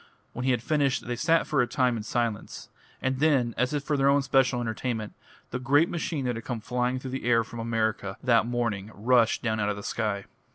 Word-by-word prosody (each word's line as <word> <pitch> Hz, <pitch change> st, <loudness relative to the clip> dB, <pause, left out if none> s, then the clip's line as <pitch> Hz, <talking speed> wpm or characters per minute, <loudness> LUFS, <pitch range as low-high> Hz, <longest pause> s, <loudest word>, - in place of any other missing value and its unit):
When 125 Hz, -, -4 dB
he -, -, +2 dB
had 120 Hz, -3 st, +1 dB
finished 140 Hz, -1 st, +1 dB
they 120 Hz, 0 st, -2 dB
sat 165 Hz, +6 st, +2 dB
for 145 Hz, -4 st, +2 dB
a 125 Hz, -, +1 dB
time 125 Hz, -2 st, +1 dB
in 110 Hz, -, -3 dB
silence; 110 Hz, 0 st, -3 dB, 0.3 s
and 130 Hz, 0 st, 0 dB
then, 135 Hz, -6 st, +3 dB
as 125 Hz, 0 st, 0 dB
if 145 Hz, -2 st, -2 dB
for 150 Hz, -, 0 dB
their 140 Hz, +1 st, +4 dB
special 130 Hz, -2 st, +2 dB
entertainment, 110 Hz, -1 st, -3 dB, 0.4 s
the 125 Hz, -, -2 dB
great 145 Hz, +5 st, +3 dB
machine 160 Hz, -4 st, -2 dB
that 125 Hz, -1 st, 0 dB
had 115 Hz, -, -6 dB
come 120 Hz, -3 st, -4 dB
flying 125 Hz, +3 st, -1 dB
through 130 Hz, 0 st, -6 dB
the 135 Hz, -, -4 dB
air 115 Hz, -1 st, +4 dB
from 115 Hz, +1 st, -9 dB
America 110 Hz, -3 st, -1 dB
that 115 Hz, -3 st, +3 dB
morning 115 Hz, -5 st, -2 dB
rushed 115 Hz, +2 st, +3 dB
down 110 Hz, -2 st, 0 dB
out 105 Hz, 0 st, +1 dB
of 105 Hz, -, -1 dB
the 100 Hz, -, -8 dB
sky. 105 Hz, -3 st, -2 dB
125 Hz, 220 wpm, -27 LUFS, 115-135 Hz, 0.4 s, their